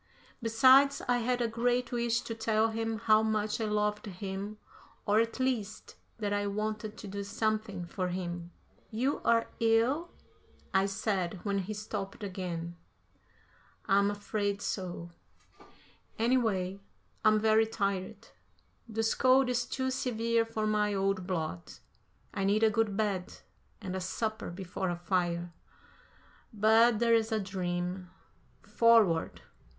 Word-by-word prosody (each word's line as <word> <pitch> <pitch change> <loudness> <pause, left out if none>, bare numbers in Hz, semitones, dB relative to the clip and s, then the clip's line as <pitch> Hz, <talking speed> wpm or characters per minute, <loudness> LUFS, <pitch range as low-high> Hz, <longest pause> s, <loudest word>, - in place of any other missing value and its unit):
Besides, 260 +5 +5
I 245 0 +2
had 245 +1 0
a - - +1
great 245 +2 0
wish 235 -1 0
to 225 - -5
tell 225 0 +1
him 225 0 -2
how 215 0 +4
much 215 0 -1
I - - 0
loved 210 0 -1
him 195 +2 -5 0.5
or, 205 +1 +3
at 230 +3 -1
least, 245 -6 -2 0.2
that 205 -2 -2
I 205 0 0
wanted 215 +1 -3
to 210 - -8
do 200 +1 -4
something 215 -3 -2
for 180 +2 -3
him. 175 -1 -4 0.4
"You 250 +6 -1
are 230 0 +3
ill?" 230 +9 +2 0.6
I 190 +1 +3
said, 195 -2 -2
when 200 -1 0
he 205 +3 -4
stopped 210 -1 -5
again. 175 -3 -5 1.1
"I'm 200 +1 +3
afraid 205 0 -2
so; 175 -3 -4 1.1
anyway, 220 -6 +1 0.4
I'm 215 0 +5
very 220 +1 +4
tired. 200 -4 -3 0.6
This 225 0 0
cold 260 0 +4
is 240 -1 0
too 260 0 -2
severe 230 -2 0
for 220 -1 -3
my 210 -1 +1
old 195 -1 0
blood. 155 - -3 0.6
I 195 - -2
need 205 +3 +2
a 220 - +5
good 215 -2 0
bed 200 -4 -2 0.4
and 190 -3 -5
a 190 - -3
supper 215 +4 -3
before 185 +1 -4
a 175 - -1
fire. 175 -1 -1 1.0
But 220 +2 +4
that's 230 0 +3
a 220 - +1
dream. 180 -1 -3 0.5
Forward! 225 -8 +3
215 Hz, 135 wpm, -30 LUFS, 190-225 Hz, 1.1 s, Besides